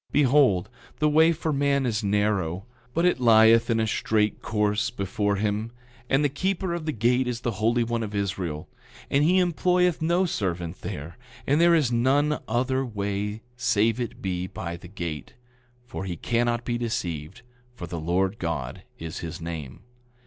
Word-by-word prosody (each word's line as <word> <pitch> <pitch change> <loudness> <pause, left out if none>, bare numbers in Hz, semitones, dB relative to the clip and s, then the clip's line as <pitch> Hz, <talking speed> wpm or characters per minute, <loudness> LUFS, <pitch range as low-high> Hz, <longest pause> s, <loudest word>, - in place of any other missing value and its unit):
Behold, 130 -10 +4 0.3
the 150 - +2
way 160 +2 +5
for 160 -1 -2
man 140 -1 +1
is 110 -2 -1
narrow, 100 -3 0 0.3
but 170 +2 +2
it 180 - +3
lieth 115 0 +6
in 115 -1 +2
a 110 - +2
straight 105 0 0
course 105 -1 0
before 105 -1 -1
him, 105 +2 -1 0.4
and 135 +2 +3
the - - +5
keeper 185 +5 -2
of 170 -2 -4
the - - +1
gate 125 +2 +1
is 120 -1 -3
the 120 - -1
Holy 120 +2 +3
One 115 0 -2
of 105 -2 -4
Israel; 95 -6 -3 0.4
and 140 +1 +3
he 180 +4 +4
employeth 180 -1 +2
no 170 +4 +2
servant 90 - -3
there; 75 +9 -7 0.3
and 145 +4 +2
there 170 0 +6
is 145 -7 +2
none 140 +5 +2
other 130 +3 0
way 105 -2 -3
save 115 -1 +1
it 120 -2 -5
be 90 -1 -2
by 85 -2 -5
the 90 +1 -11
gate; 85 -6 -6 0.5
for 120 - -6
he 90 -3 -4
cannot 120 +2 0
be 120 -1 -1
deceived, 90 -8 -4 0.3
for 90 - -6
the 85 0 -5
Lord 95 +6 0
God 80 -7 -3 0.2
is 80 -1 -6
his 85 +1 -6
name. 80 -5 -6
110 Hz, 170 wpm, -25 LUFS, 95-135 Hz, 0.5 s, lieth